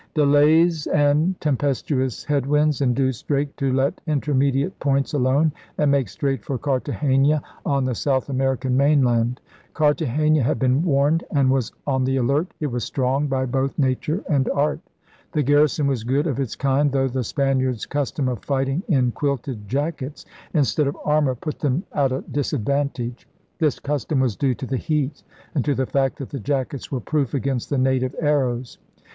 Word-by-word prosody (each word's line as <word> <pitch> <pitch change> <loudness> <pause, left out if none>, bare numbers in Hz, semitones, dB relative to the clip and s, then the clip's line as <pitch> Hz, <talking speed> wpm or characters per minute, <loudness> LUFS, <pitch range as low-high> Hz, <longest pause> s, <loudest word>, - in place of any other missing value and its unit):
Delays 155 +2 +4
and 150 +5 +2
tempestuous 135 -3 -1
head 140 -3 0
winds 150 0 +2
induced 130 -1 0
Drake 145 0 0
to 135 -2 0
let 135 +2 0
intermediate 140 +2 0
points 140 +1 0
alone 140 +3 +2 0.3
and 150 -2 +3
make 135 -7 +1
straight 135 +2 -2
for 135 - -3
Cartagena 140 +1 +1 0.2
on 140 -2 +1
the 130 - 0
South 130 +2 0
American 130 -1 0
main 140 +1 +4
land. 120 0 +1 0.4
Cartagena 150 0 +2
had 120 - +1
been 130 +4 +2
warned 155 0 +2
and 140 -4 +2
was 130 -3 0
on 130 -2 +1
the 135 +1 +1
alert. 140 +7 +1
It 150 -4 -2
was 120 -1 -2
strong 135 +4 0
by 130 -1 0
both 135 +2 -1
nature 145 +6 0
and 140 -6 +1
art. 150 +1 0 0.5
The 150 - +1
garrison 145 +1 +3
was 135 -5 0
good 135 +6 +1
of 140 -5 -1
its 130 -5 -2
kind, 140 +1 +1
though 135 0 +1
the 130 0 -2
Spaniards' 130 -2 0
custom 145 -1 -2
of 125 -5 -3
fighting 135 +3 0
in 130 -8 +2
quilted 130 -6 -3
jackets 145 +3 -3 0.3
instead 150 -1 +2
of 140 - -3
armor 150 -3 +2
put 150 +5 -6
them 145 +4 0
at 135 -2 +1
a 130 - -2
disadvantage. 140 -2 -2 0.3
This 155 -5 +1
custom 145 0 -1
was 125 -5 +1
due 130 +1 0
to 130 - -6
the 130 +1 -2
heat 150 -1 -2 0.3
and 145 -7 0
to 145 -2 0
the 130 - 0
fact 135 0 0
that 135 - -7
the 140 - -4
jackets 135 +2 -3
were 130 -3 -2
proof 145 +1 -1
against 135 -3 -2
the 145 - 0
native 130 0 +1
arrows. 130 -5 0
140 Hz, 175 wpm, -22 LUFS, 130-145 Hz, 0.5 s, Delays